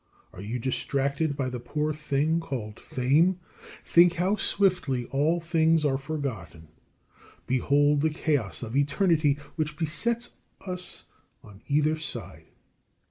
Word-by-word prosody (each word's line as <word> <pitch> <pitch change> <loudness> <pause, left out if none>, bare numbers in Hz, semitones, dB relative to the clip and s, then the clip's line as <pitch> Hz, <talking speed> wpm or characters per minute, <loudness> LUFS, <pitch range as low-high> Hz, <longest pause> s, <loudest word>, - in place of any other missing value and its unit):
Are - - -9
you 110 +5 -3
distracted 140 +4 -1
by 130 -2 -1
the 125 - -4
poor 150 +5 -2
thing 150 +2 0
called 115 -9 -6
fame? 155 +9 +2 0.4
Think 175 0 +5
how 185 +4 +1
swiftly 180 -11 +1
all 150 +5 +2
things 165 -1 +2
are 135 -2 +1
forgotten. 115 - -5 0.8
Behold 145 +3 +2
the 160 - +2
chaos 145 -8 -1
of 115 +1 -6
eternity 150 0 +2 0.2
which 150 -1 -2
besets 230 +9 -1 0.3
us 180 -1 -2 0.4
on 100 0 -15
either 150 +2 +2
side. 95 - -7
145 Hz, 125 wpm, -27 LUFS, 130-160 Hz, 0.8 s, Think